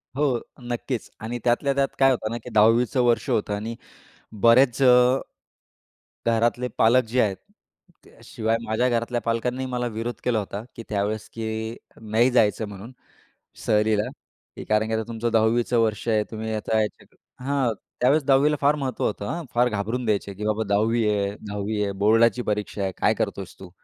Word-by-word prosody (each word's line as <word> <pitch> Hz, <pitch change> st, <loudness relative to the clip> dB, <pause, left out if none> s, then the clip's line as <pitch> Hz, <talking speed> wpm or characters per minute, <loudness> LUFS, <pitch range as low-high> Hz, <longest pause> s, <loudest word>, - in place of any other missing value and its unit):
हो, 135 Hz, -4 st, +1 dB, 0.2 s
नक्कीच. 120 Hz, 0 st, -4 dB
आणि 120 Hz, +2 st, -5 dB
त्यातल्या 130 Hz, +3 st, +2 dB
त्यात 140 Hz, 0 st, +2 dB
काय 135 Hz, 0 st, +6 dB
होतं 110 Hz, -4 st, -2 dB
ना, 120 Hz, -, -3 dB
की -, -, -8 dB
10वीचं 115 Hz, +3 st, +4 dB
वर्ष 120 Hz, -1 st, +1 dB
होतं 105 Hz, -1 st, 0 dB
आणि 110 Hz, +3 st, -5 dB, 0.7 s
बरेच 120 Hz, +3 st, +5 dB
अ, 125 Hz, +1 st, +5 dB, 1.1 s
घरातले 115 Hz, +2 st, +1 dB
पालक 125 Hz, +3 st, +5 dB
जे 125 Hz, +3 st, +2 dB
आहेत 100 Hz, -3 st, +1 dB, 0.7 s
त्या -, -, -20 dB
शिवाय 110 Hz, +1 st, -1 dB
माझ्या 115 Hz, +3 st, +1 dB
घरातल्या 120 Hz, 0 st, -1 dB
पालकांनी 125 Hz, +3 st, -1 dB
मला 125 Hz, -1 st, -2 dB
विरोध 120 Hz, +2 st, -3 dB
केला 120 Hz, -3 st, +1 dB
होता, 100 Hz, +1 st, -5 dB
की 115 Hz, -, -8 dB
त्यावेळेस 105 Hz, +1 st, -2 dB
की 110 Hz, 0 st, -4 dB, 0.3 s
नाही 110 Hz, +4 st, +2 dB
जायचं 110 Hz, -2 st, +2 dB
म्हणून 100 Hz, +4 st, -10 dB, 0.7 s
सहलीला, 105 Hz, 0 st, +2 dB, 0.5 s
की -, -, -7 dB
कारण 110 Hz, 0 st, +1 dB
की 110 Hz, -, -3 dB
आता 110 Hz, 0 st, 0 dB
तुमचं 115 Hz, 0 st, -2 dB
10वीचं 115 Hz, +2 st, +2 dB
वर्ष 110 Hz, -1 st, 0 dB
आहे. 110 Hz, -2 st, +2 dB
तुम्ही 110 Hz, 0 st, -4 dB
आता 110 Hz, +1 st, 0 dB
याच्यात 105 Hz, -, -6 dB, 0.3 s
हां, 135 Hz, -3 st, 0 dB, 0.3 s
त्यावेळेस 140 Hz, +5 st, +4 dB
10वी 135 Hz, +2 st, +4 dB
ला -, -, +1 dB
फार 145 Hz, +1 st, +4 dB
महत्त्व 135 Hz, -5 st, -3 dB
होतं, 100 Hz, -1 st, -2 dB
हां. 170 Hz, +7 st, -3 dB
फार 125 Hz, +1 st, +4 dB
घाबरून 110 Hz, +3 st, -2 dB
द्यायचे 100 Hz, -2 st, -1 dB
की 105 Hz, +2 st, -6 dB
"बाबा, 110 Hz, +1 st, 0 dB
'10वी 110 Hz, +2 st, +2 dB
आहे 100 Hz, -1 st, 0 dB, 0.2 s
10वी 105 Hz, +1 st, -2 dB
आहे', 100 Hz, -1 st, -2 dB
'बोर्डाची 115 Hz, +3 st, +4 dB
परीक्षा 105 Hz, -1 st, -3 dB
आहे', 95 Hz, -, -1 dB
काय -, -, +3 dB
करतो -, -, -2 dB
आहेस 95 Hz, -, -11 dB
तू"? 95 Hz, -, -10 dB
115 Hz, 175 wpm, -24 LUFS, 110-125 Hz, 1.1 s, काय